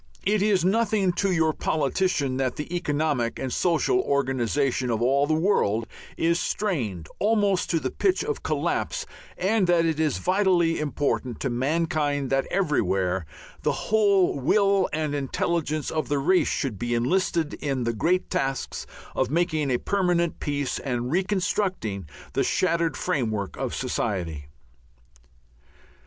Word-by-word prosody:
It 205 Hz, +1 st, +2 dB
is 195 Hz, -4 st, +2 dB
nothing 205 Hz, -2 st, +2 dB
to 200 Hz, -1 st, +1 dB
your 160 Hz, -3 st, +2 dB
politician 150 Hz, -3 st, 0 dB
that 130 Hz, -2 st, -1 dB
the 155 Hz, +4 st, -5 dB
economic 145 Hz, -7 st, 0 dB
and 130 Hz, -2 st, -3 dB
social 180 Hz, -, +2 dB
organization 135 Hz, -, 0 dB
of 115 Hz, -2 st, 0 dB
all 135 Hz, +4 st, +2 dB
the 155 Hz, -, +2 dB
world, 115 Hz, -, +1 dB, 0.3 s
is 170 Hz, +1 st, +2 dB
strained 115 Hz, -, -2 dB
almost 205 Hz, -3 st, +2 dB
to 165 Hz, -, +2 dB
the -, -, -3 dB
pitch 385 Hz, -1 st, +1 dB
of 440 Hz, +1 st, -3 dB
collapse, -, -, -1 dB, 0.3 s
and 195 Hz, +1 st, +2 dB
that 170 Hz, -1 st, +3 dB
it 160 Hz, -2 st, 0 dB
is 155 Hz, -2 st, +1 dB
vitally 180 Hz, -3 st, +2 dB
important 145 Hz, -5 st, -1 dB
to 135 Hz, -, -1 dB
mankind 145 Hz, +1 st, 0 dB
that 135 Hz, 0 st, +1 dB
everywhere 95 Hz, -, 0 dB, 0.3 s
the -, -, +1 dB, 0.2 s
whole 200 Hz, -8 st, +4 dB
will 195 Hz, +6 st, +3 dB
and 155 Hz, -1 st, -1 dB
intelligence 150 Hz, +1 st, -1 dB
of 155 Hz, -1 st, -1 dB
the 145 Hz, -, +1 dB
race 180 Hz, +7 st, +3 dB
should 120 Hz, -9 st, -2 dB
be 120 Hz, 0 st, -1 dB
enlisted 165 Hz, +5 st, +1 dB
in 135 Hz, -4 st, -2 dB
the 115 Hz, 0 st, 0 dB
great 175 Hz, -, +1 dB
tasks 135 Hz, -1 st, -2 dB, 0.3 s
of 130 Hz, -, 0 dB
making 155 Hz, -2 st, 0 dB
a 125 Hz, -, +2 dB
permanent 175 Hz, -1 st, 0 dB
peace 145 Hz, -2 st, -2 dB
and 125 Hz, -2 st, -2 dB
reconstructing 180 Hz, -, -1 dB, 0.2 s
the -, -, +1 dB
shattered 170 Hz, -2 st, +1 dB
framework 110 Hz, -, -1 dB
of -, -, -3 dB
society. 85 Hz, -9 st, -2 dB
155 Hz, 140 wpm, -25 LUFS, 130-185 Hz, 0.3 s, whole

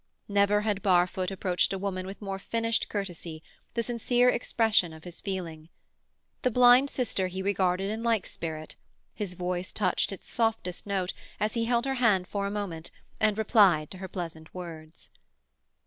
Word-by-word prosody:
Never 200 Hz, +1 st, +3 dB
had 210 Hz, -2 st, -1 dB
Barfoot 180 Hz, -1 st, +2 dB
approached 185 Hz, -2 st, +1 dB
a -, -, -1 dB
woman 185 Hz, -1 st, -3 dB
with 195 Hz, +2 st, -8 dB
more 195 Hz, -1 st, -3 dB
finished 230 Hz, +2 st, -1 dB
courtesy, 175 Hz, -5 st, -5 dB, 0.3 s
the 235 Hz, -, +1 dB
sincere 245 Hz, +1 st, +3 dB
expression 220 Hz, -7 st, +2 dB
of 160 Hz, 0 st, -12 dB
his 175 Hz, -1 st, -8 dB
feeling. 170 Hz, -5 st, -5 dB, 0.7 s
The 255 Hz, -, +2 dB
blind 250 Hz, +3 st, +6 dB
sister 230 Hz, -8 st, 0 dB
he 190 Hz, +1 st, -5 dB
regarded 195 Hz, 0 st, +1 dB
in 220 Hz, +1 st, -3 dB
like 230 Hz, -4 st, +1 dB
spirit; 155 Hz, -1 st, -6 dB, 0.4 s
his 195 Hz, -4 st, -4 dB
voice 180 Hz, 0 st, -3 dB
touched 185 Hz, -2 st, +1 dB
its 195 Hz, -, -9 dB
softest 225 Hz, -6 st, -1 dB
note 190 Hz, -2 st, -1 dB, 0.3 s
as 215 Hz, +1 st, 0 dB
he 230 Hz, -1 st, 0 dB
held 240 Hz, +1 st, +1 dB
her 270 Hz, -, 0 dB
hand 195 Hz, -6 st, +4 dB
for 200 Hz, +1 st, -2 dB
a -, -, -2 dB
moment 195 Hz, -6 st, -4 dB, 0.3 s
and 215 Hz, -1 st, +2 dB
replied 195 Hz, -8 st, +4 dB
to 185 Hz, -, -7 dB
her 190 Hz, -, -5 dB
pleasant 165 Hz, -3 st, -6 dB
words. 165 Hz, -3 st, -9 dB
195 Hz, 165 wpm, -28 LUFS, 180-220 Hz, 0.7 s, blind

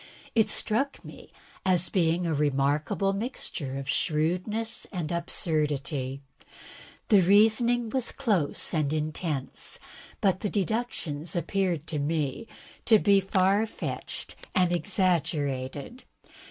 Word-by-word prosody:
It 220 Hz, -2 st, +3 dB
struck 270 Hz, +6 st, 0 dB
me -, -, -12 dB, 0.3 s
as 185 Hz, -2 st, +4 dB
being 175 Hz, -1 st, +1 dB
a 165 Hz, -, 0 dB
remarkable 145 Hz, +6 st, +1 dB
mixture 195 Hz, -, -4 dB
of 135 Hz, -1 st, -6 dB
shrewdness 180 Hz, +10 st, 0 dB
and 175 Hz, -5 st, -3 dB
absurdity. 150 Hz, -5 st, -1 dB, 0.9 s
The 205 Hz, -3 st, +7 dB
reasoning 220 Hz, +5 st, +4 dB
was 260 Hz, -3 st, 0 dB
close 205 Hz, -, 0 dB
and 150 Hz, -3 st, +1 dB
intense, 155 Hz, -2 st, -3 dB, 0.4 s
but 190 Hz, -2 st, +2 dB
the 205 Hz, -, -2 dB
deductions 185 Hz, -7 st, -2 dB
appeared 175 Hz, -3 st, -1 dB
to 155 Hz, -2 st, -3 dB
me 150 Hz, -, -2 dB, 0.4 s
to 225 Hz, -, +7 dB
be 200 Hz, -1 st, +4 dB
far 195 Hz, +3 st, +2 dB
fetched -, -, -4 dB, 0.2 s
and 180 Hz, -3 st, +3 dB
exaggerated. 160 Hz, -, -1 dB
175 Hz, 110 wpm, -27 LUFS, 150-205 Hz, 0.9 s, The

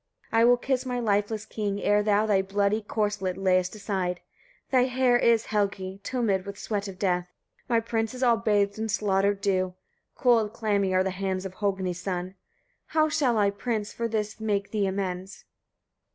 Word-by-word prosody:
43. 225 Hz, -, +3 dB
I -, -, +6 dB
will 245 Hz, +1 st, +6 dB
kiss 255 Hz, +1 st, -1 dB
my 250 Hz, -2 st, -2 dB
lifeless 210 Hz, -1 st, 0 dB
king, 205 Hz, -3 st, -3 dB
ere 205 Hz, +1 st, +3 dB
thou 210 Hz, 0 st, +2 dB
thy 200 Hz, -3 st, +3 dB
bloody 200 Hz, +2 st, 0 dB
corslet 205 Hz, -3 st, -2 dB
layest 185 Hz, 0 st, +1 dB
aside. 190 Hz, -4 st, -2 dB, 0.5 s
Thy 255 Hz, -2 st, +4 dB
hair 255 Hz, -1 st, +2 dB
is, 235 Hz, -2 st, +3 dB
Helgi! 195 Hz, -2 st, -2 dB
tumid 220 Hz, -7 st, 0 dB
with 200 Hz, 0 st, -8 dB
sweat 205 Hz, -1 st, -3 dB
of 190 Hz, -2 st, -8 dB
death; 180 Hz, -2 st, 0 dB, 0.4 s
my 230 Hz, -2 st, +4 dB
prince 225 Hz, 0 st, -2 dB
is 255 Hz, -, -3 dB
all 235 Hz, -2 st, +4 dB
bathed 205 Hz, -2 st, +1 dB
in 220 Hz, 0 st, -2 dB
slaughter 200 Hz, -1 st, +2 dB
dew; 185 Hz, -2 st, 0 dB, 0.4 s
cold, 230 Hz, -4 st, +3 dB
clammy 205 Hz, -4 st, 0 dB
are 185 Hz, 0 st, +3 dB
the 190 Hz, -, -1 dB
hands 190 Hz, 0 st, -3 dB
of 190 Hz, -, -5 dB
Hogni's 190 Hz, -3 st, -2 dB
son. 180 Hz, 0 st, -3 dB, 0.5 s
How 310 Hz, 0 st, +2 dB
shall 260 Hz, -6 st, +1 dB
I, 200 Hz, -1 st, +3 dB
prince! 210 Hz, 0 st, -3 dB
for 235 Hz, -, -2 dB
this 215 Hz, -1 st, -3 dB
make 205 Hz, -2 st, -1 dB
thee 205 Hz, -3 st, +1 dB
amends? 190 Hz, -1 st, -4 dB
205 Hz, 180 wpm, -27 LUFS, 190-225 Hz, 0.5 s, I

